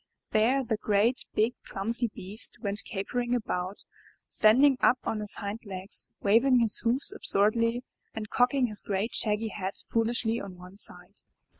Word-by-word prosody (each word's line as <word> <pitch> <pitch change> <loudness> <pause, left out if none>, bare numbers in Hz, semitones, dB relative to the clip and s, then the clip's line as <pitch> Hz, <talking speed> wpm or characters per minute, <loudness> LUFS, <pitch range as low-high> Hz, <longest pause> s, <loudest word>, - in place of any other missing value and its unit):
There 245 +5 +2
the 225 -3 -2
great, 215 +4 +1
big, 220 +3 +2
clumsy 230 +5 0
beast 210 0 +2
went 205 -1 -3
capering 240 +4 -3
about, 185 -4 -4 0.4
standing 260 +5 +4
up 255 - +4
on 220 - -3
his 210 -1 +1
hind 205 +2 -5
legs, 195 -1 -1
waving 235 +6 +4
his 230 -3 +3
hoofs 250 - +1
absurdly, 230 - +1 0.3
and 215 -1 -5
cocking 250 +4 +2
his 215 -3 0
great 205 +3 -3
shaggy 215 0 +1
head 195 -2 -5 0.2
foolishly 230 0 0
on 190 -2 -9
one 180 +2 -13
side. 205 - -5
220 Hz, 150 wpm, -28 LUFS, 200-240 Hz, 0.4 s, standing